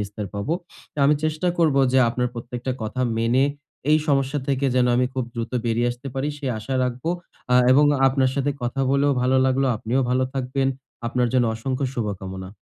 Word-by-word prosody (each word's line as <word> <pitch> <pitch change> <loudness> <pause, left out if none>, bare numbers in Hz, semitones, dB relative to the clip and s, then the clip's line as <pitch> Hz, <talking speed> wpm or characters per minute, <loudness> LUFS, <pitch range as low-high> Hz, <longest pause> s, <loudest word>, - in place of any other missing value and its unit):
নিস্তার 105 +1 -5
পাবো। 100 +10 -2 0.5
আমি 145 +2 +5
চেষ্টা 155 +3 0
করবো 150 -5 +4
যে, 130 - +5
আপনার 125 +1 -1
প্রত্যেকটা 120 +2 -4
কথা 110 +4 -3 0.2
মেনে 120 +4 +3 0.5
এই 155 - +6
সমস্যা 135 0 +1
থেকে 140 0 +1
যেনো 125 -1 +3
আমি 125 - +3
খুব 130 -2 -1
দ্রুত 115 0 -4
বেরিয়ে 120 +1 +1
আসতে 125 +3 -7
পারি 135 +2 -1
সে 140 - -6
আশা 130 +5 -4
রাখবো। 125 +5 -3 0.4
আ - - +6 0.2
এবং 145 +3 +6 0.2
আপনার 130 -1 +2
সাথে 140 0 0
কথা 120 +3 -2
বলেও 140 +1 +3
ভালো 130 +1 +3
লাগলো। 135 +1 +2
আপনিও 115 +5 -1
ভালো 130 +1 +2
থাকবেন। 135 +1 0 0.4
আপনার 125 +1 +1
জন্য 125 -2 +3
অসংখ্য 130 +4 -2
শুভকামনা। 95 -3 -5
130 Hz, 180 wpm, -23 LUFS, 120-135 Hz, 0.5 s, এই